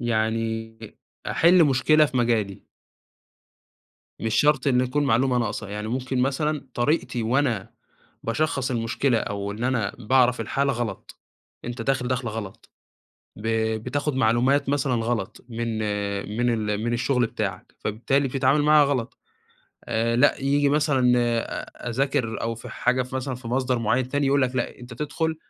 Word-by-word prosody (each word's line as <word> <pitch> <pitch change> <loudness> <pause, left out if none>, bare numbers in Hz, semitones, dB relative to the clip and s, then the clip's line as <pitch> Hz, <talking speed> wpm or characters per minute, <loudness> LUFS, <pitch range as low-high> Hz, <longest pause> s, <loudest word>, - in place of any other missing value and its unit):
يعني 110 -1 -1 0.5
أحِلّ 170 0 +5
مشكلة 150 +3 +4
في 130 - -5
مجالي. 115 -5 0 1.5
مش 110 -1 -2
شرط 150 -2 +3
إنه 125 -2 +3
يكون 145 +4 0
معلومة 125 0 +2
ناقصة، 105 -3 -3
يعني 105 +2 -5
ممكن 130 +1 -2
مثلًا 145 +2 -1
طريقتي 120 -1 0
وأنا 120 -3 0 0.5
باشخّص 135 +1 -1
المشكلة، 120 +1 +1
أو 100 -1 -3
إن 110 +4 -5
أنا 120 -6 0
باعرف 125 +1 +3
الحالة 140 +5 0
غلط، 115 -5 -5 0.4
أنت 120 0 -5
داخل 125 0 0
دَخلة 125 -2 -1
غلط، 105 -3 -8 0.7
ب 110 +2 -5 0.4
بتاخد 145 +3 -1
معلومات 130 +4 +2
مثلًا 140 -2 +1
غلط 115 -3 -2
من 115 -1 -3 0.6
من 120 +1 +2 0.2
ال 105 +1 -2
من 120 - 0
الشغل 125 +1 +1
بتاعك، 100 -4 -5
فبالتالي 135 +6 0
بتتعامل 135 +3 +2
معاها 150 0 +6
غلط 130 -4 -2 0.7
آآ، 115 0 0
لأ 135 +4 +4
ييجي 140 +1 +2
مثلًا 140 -4 +3
آآ، 120 0 -2
أذاكر 130 -2 -1
أو 115 +1 -1
في 115 - -10
حاجة 125 +1 0
مثلًا 130 0 -3
في 125 -1 -8
مصدر 125 0 0
معيّن 120 +3 0
تاني 145 +1 0
يقول 140 0 +3
لك 130 0 -1
لأ، - - -2
أنت 120 -1 -10
تدخل 160 +4 -2
125 Hz, 145 wpm, -24 LUFS, 115-140 Hz, 1.5 s, معاها